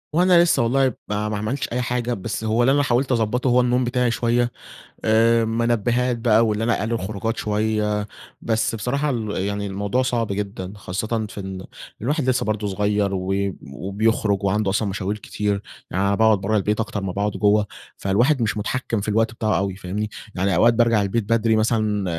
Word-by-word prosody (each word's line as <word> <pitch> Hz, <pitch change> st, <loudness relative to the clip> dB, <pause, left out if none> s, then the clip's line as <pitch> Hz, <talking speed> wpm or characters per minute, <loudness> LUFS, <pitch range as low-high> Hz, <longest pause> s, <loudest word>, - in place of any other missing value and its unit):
هو 170 Hz, -, +4 dB
أنا 180 Hz, -2 st, +6 dB
لسّه 170 Hz, -8 st, +2 dB
والله 130 Hz, +2 st, +2 dB
ما 105 Hz, +1 st, -2 dB
ما 105 Hz, -, -2 dB
عملتش 110 Hz, +6 st, -2 dB
أي 125 Hz, +1 st, -1 dB
حاجة، 120 Hz, 0 st, -1 dB
بس 110 Hz, +1 st, -4 dB
هو 110 Hz, +2 st, +2 dB
اللي 130 Hz, -, +4 dB
أنا 145 Hz, +1 st, +3 dB
حاولت 130 Hz, +1 st, +1 dB
أضبطه 120 Hz, +2 st, +1 dB
هو 125 Hz, +1 st, +4 dB
النوم 125 Hz, +1 st, +2 dB
بتاعي 125 Hz, 0 st, +1 dB
شويّة. 120 Hz, +1 st, +1 dB, 0.5 s
آآ، 115 Hz, +1 st, +4 dB
منبهات 120 Hz, +2 st, +1 dB
بقى 115 Hz, -1 st, +4 dB
وإن 105 Hz, 0 st, -1 dB
أنا 115 Hz, +1 st, +1 dB
أقلل 110 Hz, +3 st, -2 dB
الخروجات 110 Hz, +1 st, -2 dB
شويّة، 105 Hz, -1 st, 0 dB, 0.3 s
بس 115 Hz, 0 st, 0 dB
بصراحة 140 Hz, +7 st, -1 dB
ال 115 Hz, -5 st, -2 dB
يعني 100 Hz, +1 st, -2 dB
الموضوع 100 Hz, +5 st, -1 dB
صعب 120 Hz, -3 st, 0 dB
جدًا، 100 Hz, -2 st, -4 dB
خاصةً 110 Hz, +4 st, -3 dB
في -, -, -7 dB
إن 95 Hz, -1 st, -6 dB, 0.4 s
الواحد 140 Hz, +2 st, 0 dB
لسّه 130 Hz, -3 st, +1 dB
برضو 110 Hz, -1 st, -1 dB
صغيّر 100 Hz, 0 st, 0 dB
و 95 Hz, +1 st, -1 dB, 0.4 s
وبيخرج 100 Hz, +3 st, 0 dB
وعنده 100 Hz, +1 st, +1 dB
أصلًا 100 Hz, +2 st, 0 dB
مشاوير 100 Hz, +2 st, -3 dB
كتير. 105 Hz, 0 st, -2 dB, 0.3 s
يعني 95 Hz, -, -1 dB
أنا 100 Hz, -, +2 dB
باقعد 110 Hz, -1 st, +4 dB
برّه 110 Hz, +3 st, 0 dB
البيت 105 Hz, +2 st, 0 dB
أكتر 105 Hz, -2 st, -3 dB
ما 95 Hz, -2 st, -3 dB
باقعد 100 Hz, +2 st, -1 dB
جوّه، 105 Hz, +1 st, +2 dB, 0.3 s
فالواحد 120 Hz, +8 st, +2 dB
مش 110 Hz, -, 0 dB
متحكم 115 Hz, +1 st, -2 dB
في 100 Hz, -, -6 dB
الوقت 110 Hz, +2 st, +2 dB
بتاعه 110 Hz, -6 st, 0 dB
أوي، 95 Hz, -1 st, -2 dB
فاهمني؟ 100 Hz, +3 st, -4 dB, 0.2 s
يعني 95 Hz, +1 st, +1 dB
أوقات 115 Hz, +6 st, +5 dB
بارجع 115 Hz, -2 st, +3 dB
البيت 100 Hz, +3 st, -1 dB
بدري 115 Hz, -1 st, +3 dB
مثلًا، 110 Hz, -2 st, +1 dB
110 Hz, 190 wpm, -22 LUFS, 100-120 Hz, 0.5 s, أنا